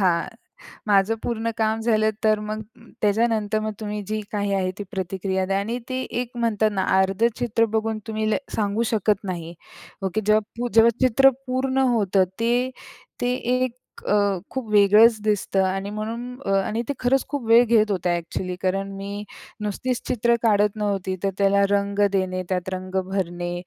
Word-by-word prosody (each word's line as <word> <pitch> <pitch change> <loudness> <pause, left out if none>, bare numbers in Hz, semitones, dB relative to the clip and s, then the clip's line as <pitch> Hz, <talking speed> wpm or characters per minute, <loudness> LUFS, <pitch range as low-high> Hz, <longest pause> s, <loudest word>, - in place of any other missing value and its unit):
हां 175 -3 +2 0.6
माझं 200 +2 +3
पूर्ण 230 -1 -1
काम 220 0 +1
झालं 220 -1 +2
तर 215 -1 +3
मग 215 +1 -4 0.4
त्याच्यानंतर 215 0 +1
मग 215 0 -3
तुम्ही 210 -1 -4
जी 215 0 -2
काही 205 -1 -1
आहे 185 -1 0
ती 205 - -4
प्रतिक्रिया 190 0 -2
द्या 195 +1 0
आणि 230 +4 -2
ते 260 0 -2 0.2
एक 245 -1 -7
म्हणतात 220 -2 +1
ना 190 - 0 0.2
अर्धं 195 +4 +2
चित्र 235 -2 +2
बघून 220 0 -1
तुम्ही 220 0 -2
ल - - +2 0.2
सांगू 210 +2 0
शकत 210 -1 +1
नाही 170 -3 -5 0.5
ओके. 190 +3 -1
जेव्हा 215 +1 +3 0.2
पू 245 0 -1
जेव्हा 230 +1 +6 0.2
चित्र 270 +3 +6 0.2
पूर्ण 260 +1 -1 0.2
होतं, 195 -4 +3 0.2
ते, 240 +2 +1 0.5
ते 245 0 +1
एक 255 0 -1 0.3
अ, 200 -2 +2
खूप 255 -5 -4
वेगळंच 210 +2 +6
दिसतं 205 -2 +1
आणि 195 +1 -2
म्हणून 230 +4 -5
अ, 195 - -1
आणि 225 +2 -1
ते - - +1
खरंच 260 +2 +2
खूप 280 -4 -3
वेळ 230 +2 +7
घेत 220 -2 +3
होतं 180 -2 -1
ॲक्चुअली 175 +1 -2
कारण 195 +1 -1
मी 200 +1 -5 0.4
नुसतीच 235 +4 -2
चित्र 235 -1 +2
काढत 210 -2 +3
नव्हती, 195 -3 -1
तर 195 - +2
त्याला 200 0 +4
रंग 200 0 0
देणे, 185 -1 0
त्यात 185 -1 -1
रंग 185 0 -6
भरणे. 175 -2 -2
210 Hz, 170 wpm, -23 LUFS, 195-230 Hz, 0.6 s, वेळ